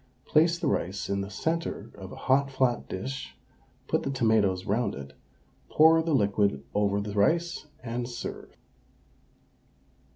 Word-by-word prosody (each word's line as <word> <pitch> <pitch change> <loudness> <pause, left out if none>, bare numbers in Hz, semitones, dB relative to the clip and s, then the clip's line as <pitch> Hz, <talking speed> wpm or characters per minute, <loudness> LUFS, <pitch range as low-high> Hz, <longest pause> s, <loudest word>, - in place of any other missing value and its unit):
Place 165 +2 +3
the 170 - -4
rice 95 -5 -1
in 100 0 0
the 100 - -5
centre 160 -2 -3
of 95 -2 -10
a - - -8
hot 135 +1 +3
flat 130 -2 0
dish, 130 +8 -5 0.5
put - - +1
the - - -3
tomatoes 110 -8 +2
round 105 +1 0
it, 70 0 -9 0.6
pour 160 +1 +6
the 160 -2 +1
liquid 100 - +1
over 100 -1 +1
the 100 0 -4
rice, 165 +11 +1 0.2
and 120 0 -3
serve. 120 - -7
115 Hz, 140 wpm, -28 LUFS, 100-140 Hz, 0.6 s, pour